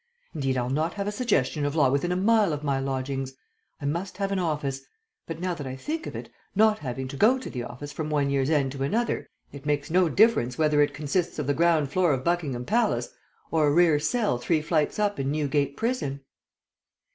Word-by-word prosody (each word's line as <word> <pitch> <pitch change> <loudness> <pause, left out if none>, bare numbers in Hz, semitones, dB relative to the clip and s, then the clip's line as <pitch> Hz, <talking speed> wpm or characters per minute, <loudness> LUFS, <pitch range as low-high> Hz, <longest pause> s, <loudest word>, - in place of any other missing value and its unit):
Indeed, 135 -5 -1
I'll 125 0 -1
not 155 +5 0
have 200 -1 -3
a - - 0
suggestion 165 - 0
of 145 +1 -1
law 140 -5 +4
within 140 +6 0
a - - +1
mile 205 -2 +3
of 150 0 -4
my 140 -2 0
lodgings! 135 0 -3 0.5
I 140 - -6
must 170 +7 -3
have 200 -1 -1
an 195 - 0
office; 145 -6 -2 0.5
but 165 -1 -5
now 180 0 -1
that 145 -5 -6
I 130 - -5
think 315 - -4
of - - -7
it, - - -7 0.2
not 215 +1 +4
having 130 -1 -4
to 140 - -6
go 225 - +4
to 260 - -7
the 125 - -4
office 125 +5 -7
from 155 0 -4
one 145 -2 +1
year's 135 0 +1
end 140 -4 +2
to 135 0 -7
another, 220 +12 0 0.2
it 140 +1 -9
makes 145 +1 -1
no 180 -1 +4
difference 195 - +3
whether 150 -2 +3
it 145 - +1
consists 155 +4 -1
of 150 - -2
the 145 - +1
ground 160 -3 +2
floor 180 -3 +3
of 130 -1 -2
Buckingham 145 -8 -1
Palace 235 +3 +1 0.4
or 155 -2 +3
a - - +3
rear 165 -1 +4
cell 205 - 0
three 155 +4 0
flights 155 -2 0
up, 205 -4 0
in 135 0 -1
Newgate 145 -1 0
Prison." 220 - -2
150 Hz, 220 wpm, -26 LUFS, 140-180 Hz, 0.5 s, law